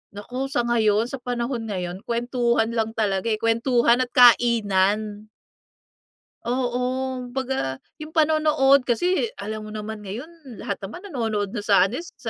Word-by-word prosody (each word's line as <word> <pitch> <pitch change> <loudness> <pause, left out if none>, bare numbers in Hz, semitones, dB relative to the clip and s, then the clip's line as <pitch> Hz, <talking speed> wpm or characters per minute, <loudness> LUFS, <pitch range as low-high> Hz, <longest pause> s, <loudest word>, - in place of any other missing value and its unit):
Naku, 250 +6 -4
sa 240 - 0
ngayon, 220 -3 +2
sa 275 - -5
panahon 240 -1 -3
ngayon. 180 -2 -4
Kwentuhan 235 -1 0
lang 225 -1 -2
talaga 200 -2 0
eh, 220 - +2
kwentuhan 235 +2 +2
at 255 - +1
kainan. 215 -3 +3 1.2
Oo. 245 0 -1 0.5
Kumbaga, 260 - -2 0.2
yung 305 0 -9
panonood, 305 -4 +3
kasi 355 - +1 0.2
alam 215 0 -5
mo 215 - -9
naman 215 0 -6
ngayon, 260 - -9
lahat 200 - -3
naman 280 - -9
nanonood 220 - -2
na 205 0 -5
sa 195 -2 +4
ano, 245 - -4
sa 290 -8 -8
235 Hz, 140 wpm, -23 LUFS, 210-255 Hz, 1.2 s, sa